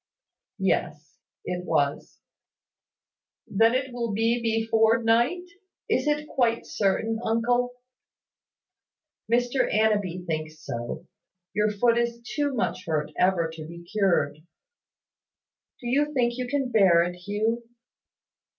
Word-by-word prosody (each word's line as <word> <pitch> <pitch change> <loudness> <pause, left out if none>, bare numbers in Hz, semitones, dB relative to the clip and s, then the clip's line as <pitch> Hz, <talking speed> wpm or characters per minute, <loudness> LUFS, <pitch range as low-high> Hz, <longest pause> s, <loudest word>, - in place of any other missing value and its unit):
"Yes, - - -2 0.3
it 180 0 -3
was." 145 -5 -1 1.2
"Then 225 +4 +3
it 260 -1 -2
will 235 -3 -2
be 230 +3 +1
before 225 0 +3
night. 240 +11 +2 0.4
Is - - +1
it 300 0 0
quite 235 -5 +1
certain, 225 -4 0
uncle?" 245 +2 +1 1.6
"Mr 245 +2 +2
Annanby 205 -5 +1
thinks 155 -2 -4
so. 120 -5 -6 0.5
Your 210 0 +2
foot 235 +3 +2
is 235 0 -1
too 285 +2 -2
much 200 -5 -2
hurt 150 -2 -1
ever 180 -3 +2
to 155 -1 -8
be 170 +1 -10
cured. 180 -6 +1 1.4
Do - - -13
you 290 +4 +2
think 240 -4 +1
you 250 0 -3
can 270 -1 -1
bear 190 -6 +5
it, 175 +1 -3
Hugh?" 210 +6 -2
225 Hz, 115 wpm, -26 LUFS, 180-245 Hz, 1.6 s, bear